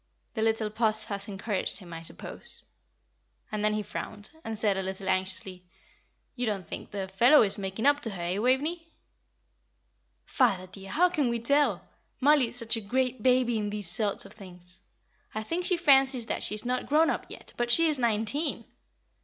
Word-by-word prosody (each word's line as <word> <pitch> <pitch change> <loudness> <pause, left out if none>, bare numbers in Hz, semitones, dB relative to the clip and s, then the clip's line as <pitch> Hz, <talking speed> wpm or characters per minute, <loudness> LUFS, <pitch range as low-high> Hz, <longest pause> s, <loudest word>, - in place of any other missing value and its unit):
The 220 - -3
little 220 -1 +1
Puss 215 -1 +1
has 200 -1 -4
encouraged 200 0 -2
him, 175 -4 -11
I 165 - -6
suppose." 165 - -8 0.9
And 210 -1 -2
then 215 0 +2
he 215 - -1
frowned, 210 0 -7
and 225 -1 -4
said, 210 -2 +1
a 190 - -1
little 190 +1 -5
anxiously, 185 -1 -1 0.7
"You 245 -2 -1
don't 195 -5 -2
think - - -7
the 195 -2 -4
fellow 235 +10 +6
is 205 -1 -1
making 195 +4 -3
up 285 0 +5
to 245 - -2
her, 185 -4 -6
eh, 180 +3 -1
Waveney?" 295 +8 +1 1.4
"Father, 200 -9 +2
dear, 195 +1 -9
how 360 - +3
can 295 -7 0
we 235 0 -1
tell? 280 +5 +1 0.3
Mollie 285 -2 +5
is 230 - -6
such 230 -1 +1
a 225 - -4
great 255 +3 -1
baby 250 -2 +3
in 205 -1 -2
these 205 -4 -3
sort 205 +1 0
of - - -13
things; 180 -2 -11 0.5
I 215 - -2
think 345 +9 -2
she 360 - +2
fancies 270 -6 +4
that - - -3
she 210 - +1
is 215 - -2
not 250 +1 -1
grown 315 +3 +4
up - - -4
yet, - - -12
but 240 0 -1
she 330 +7 +5
is 300 -4 +2
nineteen. 230 +6 0
220 Hz, 190 wpm, -28 LUFS, 195-260 Hz, 1.4 s, fellow